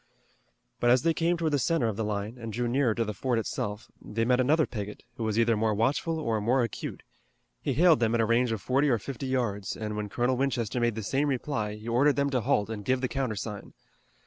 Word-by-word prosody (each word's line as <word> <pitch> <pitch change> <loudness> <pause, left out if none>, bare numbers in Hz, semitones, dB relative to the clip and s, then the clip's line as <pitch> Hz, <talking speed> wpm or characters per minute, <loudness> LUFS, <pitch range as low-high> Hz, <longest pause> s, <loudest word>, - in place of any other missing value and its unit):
But 120 - +3
as 125 +3 +5
they 165 0 +3
came 170 +2 +1
toward 160 -2 0
the 145 - +3
center 165 -5 +1
of 110 - -2
the 110 - -2
line, 105 +2 -3
and 115 -1 -6
drew 120 +3 -1
nearer 120 -2 +2
to 115 - 0
the 105 - -3
fort 120 +4 -1
itself, 105 -1 -3
they 115 +2 -2
met 125 +1 +3
another 150 +5 +3
picket, 105 -3 -6
who 115 - -3
was 110 -1 -1
either 115 0 +3
more 110 0 +1
watchful 140 +9 0
or 115 -8 -1
more 125 +4 +2
acute. 115 - -5 0.6
He 140 - -1
hailed 165 +2 +5
them 115 -1 +2
at 115 - +2
a - - +3
range 115 +2 +2
of 110 -3 -2
forty 135 +7 +2
or 120 - +3
fifty 135 +4 -6
yards, 115 -7 -1
and 105 -1 -4
when 105 -1 -3
Colonel 125 +4 0
Winchester 125 -3 -1
made 120 -2 +1
the 110 - -4
same 135 +7 0
reply 120 -6 -2
he 105 +2 -10
ordered 135 +5 +3
them 140 0 +1
to 130 -3 +1
halt 105 -1 +1
and 105 -2 -5
give 130 +4 +1
the 130 - +1
countersign. 110 -6 -4
120 Hz, 240 wpm, -28 LUFS, 110-135 Hz, 0.6 s, as